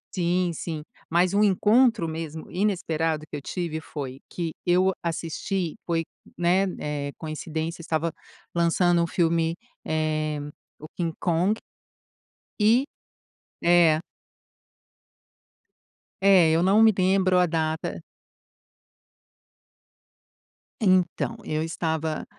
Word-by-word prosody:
Sim, 175 0 +1
sim. 155 -1 -5 0.3
Mas 175 +3 +2
o 210 - +4
encontro 215 0 +4
mesmo 160 -1 -6
inesperado 165 -5 -1
que - - -7
eu 145 - -5
tive 165 -1 -3
foi 135 -4 -7
que 165 -3 -4
eu 185 +2 +3
assisti 170 +1 -2
foi, 165 -1 0 0.3
né, 180 +3 +3
eh, 145 -1 -3
coincidência, 160 +1 -4
estava 165 0 -1 0.4
lançando 170 0 +3
o - - -1
filme, 165 -1 +1 0.3
eh, 155 -1 -1 0.4
o 155 - -9
King 165 -2 -1
Kong. 180 +5 +1 1.0
E 230 +6 +5 0.8
é. 170 -2 +5 2.2
É, 185 -5 +6
eu 165 +1 +3
não 195 +4 +4
me 220 -1 +6
lembro 185 0 +3
a 180 - +5
data. 160 -1 -2 2.8
Então, 185 -3 +2
eu 155 0 -2
estava, 160 -1 -2
170 Hz, 100 wpm, -25 LUFS, 160-185 Hz, 2.8 s, É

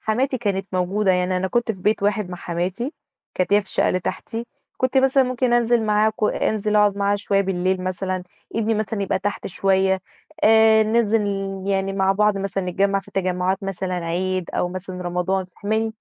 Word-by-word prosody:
حماتي 255 +4 0
كانت 195 -4 -1
موجودة، 185 +2 +1
يعني 180 0 +1
أنا 190 +1 -1
كنت 235 +2 0
في 190 - -13
بيت 210 -1 +1
واحد 205 -2 0
مع 180 - -5
حماتي، 180 - -3 0.4
كانت 185 +1 0
هي 205 - +6
في 200 - -13
الشقة - - +2
اللي 185 - 0
تحتي، 225 +6 -4 0.3
كنت 255 +1 +1
مثلًا 270 +1 +4
ممكن 255 -1 0
أنزل 240 -1 +3
معاها 215 0 +3
ك 215 - -14
أنزل 210 0 0
أقعد 205 -1 +4
معاها 200 0 +1
شوية 200 -1 +1
بالليل 185 -1 0
مثلًا، 185 0 -2 0.3
ابني 225 0 +1
مثلًا 215 -1 -2
يبقى 195 - 0
تحت 200 +2 -3
شوية، 190 0 +1 0.4
آآ 220 0 +6
ننزِل 220 0 +2 0.4
يعني 195 0 0
مع 195 0 +2
بعض 210 0 +2
مثلًا 195 -1 -2
نتجمع 195 +2 +1
في 200 - -17
تجمعات 185 0 -1
مثلًا 190 -1 -3
عيد 180 +1 -2
أو 180 - -1
مثلًا 185 0 -6
رمضان، 180 +2 -1
فاهماني؟ 220 +4 -2
195 Hz, 185 wpm, -22 LUFS, 185-220 Hz, 0.4 s, هي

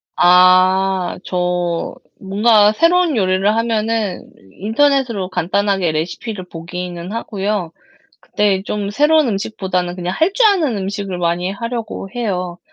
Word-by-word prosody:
아 185 +1 +4
저 180 -1 -2 0.2
뭔가 210 +2 +3
새로운 335 0 +2
요리를 185 0 +1
하면은 225 -3 -1 0.2
인터넷으로 230 - 0
간단하게 190 0 0
레시피를 180 +5 -4
보기는 175 +1 -7
하고요. 205 -5 -3 0.5
근데 200 -2 0
좀 205 -1 -3
새로운 295 +3 +3
음식보다는 190 -3 -2
그냥 180 0 -4
할 330 +5 +1
줄 460 +2 +4
아는 325 - +2
음식을 195 -1 -4
많이 175 +1 -1
하려고 230 -1 -5
해요. 180 -7 -3
195 Hz, 280 characters per minute, -17 LUFS, 180-225 Hz, 0.5 s, 아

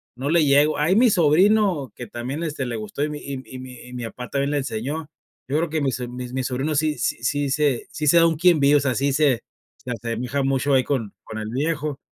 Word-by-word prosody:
no 130 +3 -3
le 165 0 +4
llego. 145 +2 +4
Ahí 155 +6 +2
mi 240 +3 +5
sobrino, 180 - +3
que 120 - -7
también, 125 +8 -5
este, 150 -4 -3
le 120 -1 -3
gustó 110 +6 -4
y 150 - -1
mi 150 0 -5
y 140 -2 -6
y 130 - -9
mi 130 -1 -10
y 125 - -12
mi 125 -1 -5
papá 125 +2 -8
también 140 0 -1
le 145 - +1
enseñó. 140 +4 -3 0.4
Yo 140 +3 0
creo 165 +1 0
que 155 0 -1
mise 125 -3 -1
mis 125 0 -7
mis 130 -1 -1
sobrinos 135 +4 -1
sí 155 -1 0
sí - - -2
sí 145 -1 0
se 140 -3 0
sí 150 +1 -3
se 170 - +6
da 165 0 +6
un 165 - +1
quién 170 0 +4
vive, 140 +1 +5
o - - +3
sea, 130 -3 0
sí 140 +1 +1
se 140 -4 +2 0.3
se 125 - -7
asemeja 120 +3 -2
mucho 135 +1 +1
ahí 130 -1 +4
con 120 -7 -2
con 110 - -8
el 110 0 -5
viejo. 145 +2 -2
140 Hz, 250 wpm, -23 LUFS, 125-150 Hz, 0.4 s, se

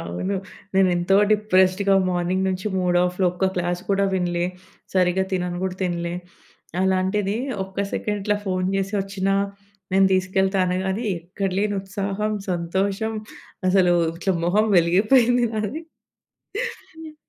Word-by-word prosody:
అవును. 90 - -3 0.4
నేను 190 -1 +5
ఎంతో 175 +3 +2 0.2
డిప్రెస్డ్‌గా 195 -1 +3 0.2
మార్నింగ్ 180 +2 0
నుంచి 185 +1 -3
మూడ్ 180 -1 +1
ఆఫ్‌లో 180 +1 0
ఒక్క 185 +2 0
క్లాస్ 175 0 -1
కూడా 200 0 +3
వినలే. 175 -1 0 0.5
సరిగ్గా 185 0 +3
తినను 180 -1 -1
గూడా 190 -1 -2
తినలే. 170 -1 -2 0.7
అలాంటిది 190 +2 +1 0.3
ఒక్క 190 0 -16 0.2
సెకండ్ 210 -1 -2
ఇట్లా 210 0 +2
ఫోను 185 -1 0
చేసి 195 +1 -2
వచ్చినా, 195 0 -1 0.6
నేను 195 0 +5
తీసుకెళ్తా 190 +1 +1
అనగాని 190 +4 -1 0.2
ఎక్కడ 185 +3 -3
లేని 205 0 0
ఉత్సాహం, 200 +2 -2 0.2
సంతోషం 195 +5 -1 0.6
అసలు 185 -2 +4 0.2
ఇట్లా 190 +2 0
మొహం 210 +5 +3
వెలిగిపోయింది 225 +8 +4
నాది. 215 +8 -2 1.1
హ్మ్. 320 -1 -10
190 Hz, 125 wpm, -23 LUFS, 180-200 Hz, 1.1 s, నేను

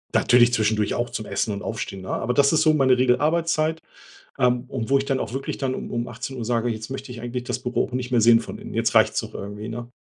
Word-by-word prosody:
Natürlich 120 0 +5
zwischendurch 110 -2 +1
auch 120 0 -1
zum 110 - -5
Essen 105 - -1
und 100 - -6
Aufstehen, 105 -4 -5
ne? - - -8
Aber 125 - -1
das 140 0 +4
ist 160 - +3
so 155 0 +5
meine 130 -3 +3
Regelarbeitszeit, 155 +5 +1 0.6
ähm, 125 -1 +2
und 120 -4 -4
wo 140 - +5
ich 135 - -2
dann 135 -1 0
auch - - -4
wirklich 135 +1 -4
dann 130 -2 -1
um - - -6
um 120 0 -2
18:00 125 +1 -6
sage, 120 0 0
jetzt 110 -1 -5
möchte 135 -1 -6
ich 120 -2 -8
eigentlich 120 +1 -4
das - - -3
Büro 125 - -1
auch - - -13
nicht 125 0 -3
mehr 120 -2 +2
sehen 115 +1 +6
von 115 - -7
Innen. - - -9
Jetzt - - 0
reicht's - - +4
auch - - -10
irgendwie, 105 +2 -6
ne? 120 +1 -6
125 Hz, 260 wpm, -23 LUFS, 115-135 Hz, 0.6 s, sehen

